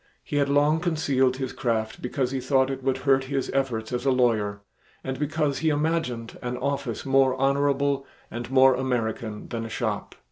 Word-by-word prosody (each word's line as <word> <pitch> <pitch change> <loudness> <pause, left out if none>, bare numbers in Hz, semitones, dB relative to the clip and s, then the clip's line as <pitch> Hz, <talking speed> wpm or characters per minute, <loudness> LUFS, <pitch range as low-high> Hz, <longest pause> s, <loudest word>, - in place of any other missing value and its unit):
He 145 - -3
had 140 -1 +2
long 145 +3 +3
concealed 140 -7 +1
his 130 -1 -4
craft 115 -4 -2
because 125 0 -1
he 135 - -1
thought 130 +1 +2
it 135 0 -4
would 135 0 0
hurt 135 0 +2
his 135 0 -2
efforts 125 -4 -1
as 120 0 -1
a 135 - +2
lawyer 110 -6 +1 0.4
and 130 0 -4
because 150 -1 0
he 160 +2 +2
imagined 150 -6 -1
an 125 0 -3
office 135 -5 -3
more 135 -1 +4
honorable 140 0 +1 0.2
and 120 +1 -5
"more 130 0 +6
American" 115 -4 -2
than 115 -1 -3
a 115 - -6
shop. - - -3
135 Hz, 180 wpm, -25 LUFS, 125-140 Hz, 0.4 s, more